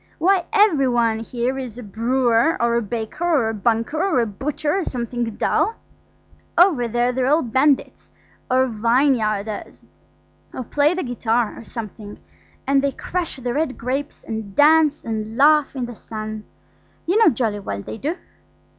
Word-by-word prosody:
Why, 365 +2 +2
every 405 -11 +4
one 235 -3 +1
here 245 +3 -2
is 245 -4 -7
a 245 - -7
brewer, 235 - +1
or 235 0 +2
a 235 - +2
baker, 225 - -5
or 305 -10 +2
a - - -2
banker, 230 +8 0
or 380 -9 +2
a 235 - +2
butcher, 295 - -2
or - - -1
something 240 -3 -3
dull. 450 - +1 0.8
Over 335 -10 +4
there 240 +2 +1
they're 255 0 0
all 305 +4 +3
bandits, 265 +4 +1 0.4
or 260 0 +3
vineyardiners, 225 -3 0 0.7
or 255 - -4
play 295 +7 +1
the 370 - -2
guitar, 240 -2 0
or - - -10
something, 215 -2 -8 0.5
and 275 0 +3
they 280 -1 0
crush 360 -2 -4
the 250 -2 -4
red 295 -2 -1
grapes 270 +4 -4
and 220 -3 -6
dance 305 0 +4
and 220 0 -4
laugh 300 0 +4
in 255 -2 -2
the 240 -1 -8
sun–you 215 - -7
know 450 - +7
jolly 225 -6 -1
well 100 - -5
they 225 - -7
do." 305 +8 -2
245 Hz, 160 wpm, -21 LUFS, 225-295 Hz, 0.8 s, know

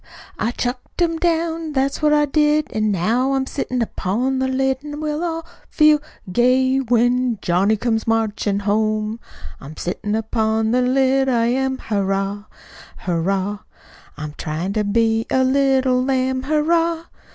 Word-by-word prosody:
I 225 - 0
chucked 245 +4 -5
'em 330 -1 0
down, 330 -2 -1
that's 270 +1 0
what 300 -1 +3
I 295 0 +4
did, 300 +1 +1
An' 215 0 0
now 230 +8 +1
I'm 270 -1 0
sittin' 255 -3 -2
upon 240 +6 -1
the 260 - 0
lid, 265 0 0
An' 295 0 -7
we'll 305 +1 -2
all 330 -1 -3 0.2
feel 305 -1 +5 0.3
gay 260 +4 +3
when 245 -1 +1
Johnny 195 +5 +1
comes 225 0 -1
marchin' 215 -2 0
home. 215 +2 0 0.4
I'm 145 +3 -11
sittin' 205 +4 -3
upon 220 0 0
the 250 +1 +2
lid, 265 +1 +2
I 235 -2 +2
am, 265 +2 0
Hurrah! 200 -2 -2 0.5
Hurrah! 190 +3 -1 0.6
I'm 150 0 -6
tryin' 165 +5 -3
to 215 0 0
be 225 +2 +1
a 260 - +2
little 260 -1 +2
lamb, 260 0 0
Hurrah! 330 +3 +1
250 Hz, 145 wpm, -20 LUFS, 215-270 Hz, 0.6 s, feel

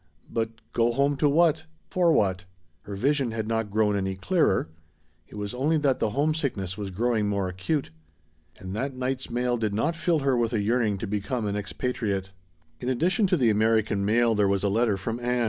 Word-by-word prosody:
But 115 -1 0 0.2
go 120 0 +2
home 140 +3 +2
to 145 +1 +3
what? 160 +1 +3 0.3
For 175 -2 +3
what? 95 - +1 0.4
Her 100 - -6
vision 135 +4 +1
had 110 -1 -3
not 115 -1 -1
grown 105 0 +2
any 95 -1 -1
clearer. 155 - +1 0.6
It - - -13
was 105 0 -4
only 145 +6 +1
that 140 -3 +1
the 110 - +1
"homesickness" 140 - -1
was 100 -1 -5
growing 110 +2 0
more 100 -2 0
acute. 95 - -2 0.7
And 95 +1 -7
that 135 +4 -3
night's 130 0 -3
mail 120 +1 0
did 110 -3 -1
not 150 +10 0
fill 165 -2 +1
her 135 -1 +2
with 120 -1 0
a 110 - +1
yearning 110 -1 +1
to 100 - -4
become 105 +3 -2
an 100 0 -1
expatriate. 100 -2 -3 0.5
In 125 - -3
addition 180 - +2
to 180 - +2
the 120 -6 +3
"American 110 -1 +2
mail" 115 +3 +3
there 105 -2 +2
was 100 0 0
a 100 - +2
letter 110 0 +2
from 115 +5 -4
Ann. 125 0 0
115 Hz, 200 wpm, -26 LUFS, 105-135 Hz, 0.7 s, to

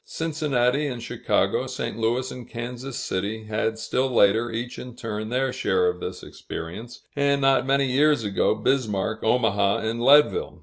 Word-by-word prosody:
Cincinnati 150 -4 0
and 125 -3 -4
Chicago, - - 0
St. - - -4
Louis 120 +3 -1
and 125 -2 -9
Kansas 125 +2 -6
City, 105 +4 -3
had 110 +1 -2
still 130 +3 -1
later, 115 +1 +3
each 120 +2 -5
in 125 -2 -9
turn, 110 -2 -5
their 130 +1 0
share 95 -1 +1
of 90 0 -1
this - - -6
experience; 110 +9 -8
and, 140 0 +2
not 135 -1 +3
many 140 0 +3
years 140 0 +3
ago, 100 -2 +1
Bismarck, 110 -5 -1
Omaha, 105 -4 +2
and 115 +2 -2
Leadville. 150 - +4
120 Hz, 160 wpm, -24 LUFS, 110-135 Hz, -, Leadville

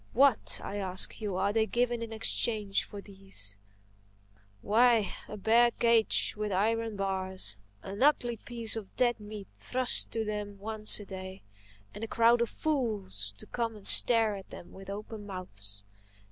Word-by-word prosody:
What, 270 -2 +3
I 205 - -5
ask 190 +2 0
you, 205 -3 -3
are 200 +2 0
they 220 0 +1
given 240 +2 -1
in 230 -1 -6
exchange 220 -2 +1
for 205 - -9
these? 195 - -6 1.1
Why, 230 -1 +3
a 210 - -8
bare 230 +4 +4
cage 230 -1 +3
with 210 -1 -3
iron 225 +3 0
bars; 190 - -1 0.3
an 200 +3 -7
ugly 245 -5 +2
piece 230 0 -4
of 215 -4 -8
dead 240 -2 +2
meat 210 -1 -9
thrust 255 0 -1
in 225 - 0
to - - -3
them 210 -1 -5
once 215 +1 +2
a 205 - -9
day; 190 -1 -9 0.5
and 215 - -8
a - - -3
crowd 230 +1 +3
of 235 - 0
fools 205 - -2
to - - -9
come 230 -2 -3
and 205 -2 +1
stare 225 -3 +7
at 195 -1 -10
them - - -12
with 195 0 -11
open 210 +1 -7
mouths! 100 - -6
210 Hz, 165 wpm, -30 LUFS, 195-230 Hz, 1.1 s, stare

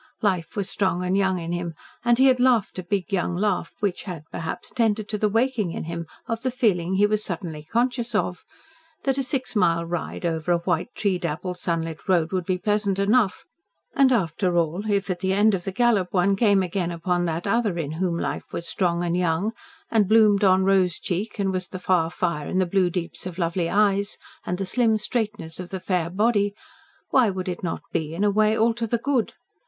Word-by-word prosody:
Life 185 -5 0
was 200 -3 -2
strong 185 -3 0
and 180 +1 +1
young 190 -1 +2
in 170 -1 -4
him, 175 -2 -3 0.3
and 240 -1 +4
he 265 - +5
had 260 -2 +5
laughed 240 -7 +2
a - - -4
big 195 +2 -2
young 180 -2 0
laugh, 190 -3 0
which 200 -3 0
had, 175 -6 -6
perhaps 165 - -5
tended 220 -3 +1
to 210 - -1
the 210 - +2
waking 225 -5 0
in - - -4
him 170 0 -5 0.2
of 230 0 -2
the 260 - 0
feeling 190 -8 +1
he 205 +2 +4
was 210 0 +1
suddenly 165 -4 -5
conscious 240 - -1
of 180 - -1 0.6
that 270 0 +1
a - - +1
six 260 -1 -2
mile 170 -4 +2
ride 175 +1 -4
over 165 0 -1
a 175 - +4
white, 170 -1 -1
tree 195 -4 0
dappled, 175 +2 -4
sunlit 165 -1 -3
road 170 -3 +3
would 185 -3 -2
be 185 - +1
pleasant 205 0 0
enough, 205 +1 +2 0.5
and, 275 -4 +4
after 180 -4 +1
all, 170 +6 0
if 200 -1 +1
at 175 - -3
the 190 +1 0
end 210 +2 +4
of 180 -3 -2
the 195 - -2
gallop 215 -3 +2
one 195 +1 +2
came 200 -2 +3
again 180 -1 -2
upon 175 +1 -1
that 165 0 -2
other 210 -3 +1
in 155 -3 -3
whom 170 +1 -1
life - - -4
was 170 - -5
strong 175 -2 0
and 175 0 0
young, 180 +4 +1 0.4
and 210 -4 +3
bloomed 215 -2 +5
on 190 -1 +5
rose 190 -3 +3
cheek 195 +5 -3
and 195 -2 0
was 185 -1 -3
the 185 - -7
far 180 -3 +1
fire 170 -4 -2
in - - -2
the 185 - +3
blue 185 0 +2
deeps 175 +1 -4
of 180 -1 -7
lovely 170 -1 0
eyes, 200 0 +2 0.3
and 180 - -1
the 195 - -2
slim 225 +2 +2
straightness 210 -7 -3
of 180 -1 -6
the 190 - -4
fair 180 -3 -1
body, 205 +1 +1 0.6
why 250 -5 +5
would 185 -1 -4
it 180 -1 -3
not 175 - -3
be, 155 0 -2
in 195 - -1
a 205 - +4
way, 215 +2 +3
all 230 +1 +3
to 230 0 -3
the 235 - +1
good? 255 -1 0
190 Hz, 220 wpm, -24 LUFS, 175-215 Hz, 0.6 s, he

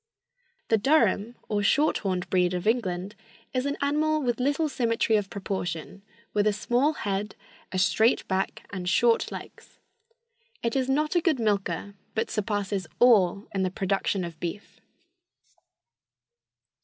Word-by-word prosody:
The 225 - +4
Durham 235 -3 +2
or 210 -1 0
short 290 +9 +3
horned 185 -3 -2
breed 180 -1 +2
of 180 +2 -3
England 200 -4 0 0.4
is 255 +1 0
an 285 - -2
animal 305 +2 +1
with 240 -2 0
little 285 +5 +1
symmetry 230 -5 +1
of 205 -2 0
proportion, 190 -2 -4 0.3
with 210 0 +2
a 210 - +3
small 245 +8 +1
head, 205 -4 -3 0.4
a 185 - -2
straight 220 +5 +3
back 190 0 -2
and 180 -2 -3
short 230 +5 +3
legs. - - -10 0.9
It 230 +2 0
is 265 -1 0
not 300 +3 +1
a 345 - +3
good 315 -6 +1
milker, 200 -3 -1 0.2
but 220 0 -1
surpasses 205 -3 -2
all 205 -5 +4
in 195 - 0
the 185 - +1
production 195 0 -1
of 170 -2 -7
beef. 175 +4 -6
210 Hz, 145 wpm, -27 LUFS, 190-250 Hz, 0.9 s, The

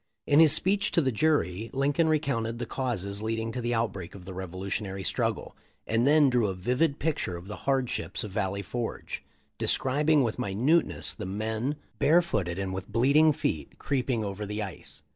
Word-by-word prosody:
In 145 - +4
his 160 -2 +8
speech 200 +6 +4
to 170 - +4
the 135 -3 +1
jury, 115 - +1
Lincoln 145 +4 +2
recounted 120 -7 0
the 120 - -3
causes 105 -6 -2
leading 115 +1 -2
to 125 - -4
the 120 0 -1
outbreak 100 -6 -3
of 95 -2 -11
the 95 - -7
Revolutionary 95 +2 -4
strug - - 0
gle, - - -11 0.3
and 115 +3 +1
then 150 0 +6
drew 125 -4 +2
a 95 - -3
vivid 125 - 0
picture 145 - -2
of 85 +2 -11
the 105 - -6
hardships 130 -2 -1
of 105 - -6
Valley 100 -1 -2
Forge, 120 +1 -5 0.4
describing 145 +2 +3
with 115 0 -2
minuteness 125 - +1
the - - -6
men, 110 +7 -2 0.2
barefooted 140 - +2
and 95 -1 -3
with 95 +2 -6
bleeding 140 +7 +5
feet, 80 - -3
creeping 125 -4 -1
over 100 0 -4
the 105 +1 -3
ice. 95 -4 -10
115 Hz, 180 wpm, -28 LUFS, 100-140 Hz, 0.4 s, his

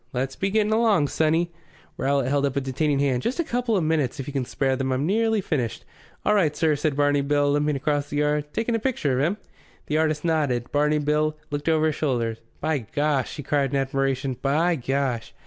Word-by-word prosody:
"Let's 130 +2 -2
be 195 - -1
getting 215 +1 +2
along, 215 -10 +3
sonny." 165 +2 +1 0.4
Rowlatt 135 -1 0
held 140 +1 +2
up 135 - -4
a 140 - +1
detaining 140 +2 0
hand. 135 -3 +1
"Just 255 - -2
a - - +3
couple 245 -6 0
of 180 - 0
minutes, 155 -4 0
if 135 - -4
you 145 - -7
can 135 -3 -1
spare 135 +1 0
them. 130 0 -2
I've 130 - 0
nearly 220 +7 +1
finished." 130 - -2 0.4
"All 210 - +4
right, 165 -8 +2
sir," 155 -1 +2
said 145 0 -1
Barney 145 0 +3
Bill, 145 0 +2
limping 145 0 +1
across 145 +1 -1
the 145 - -3
yard. 150 0 +1
"Taking 230 +6 -1
a 230 - +1
picture 155 - 0
of - - +2
him?" 175 +7 0 0.5
The 155 +1 0
artist 155 0 0
nodded. 145 -7 0
Barney 150 +1 +2
Bill 150 +1 0
looked 145 +2 -2
over 160 -1 +3
his 155 -2 +1
shoulder. 120 -6 -1 0.2
"By 155 -1 0
Gosh!" 140 +3 -1
he 145 - -6
cried 140 -2 0
in - - +2
admiration. 135 -1 -1
"By 160 +5 +2
Gosh!" 130 -3 -2
145 Hz, 215 wpm, -24 LUFS, 135-160 Hz, 0.5 s, All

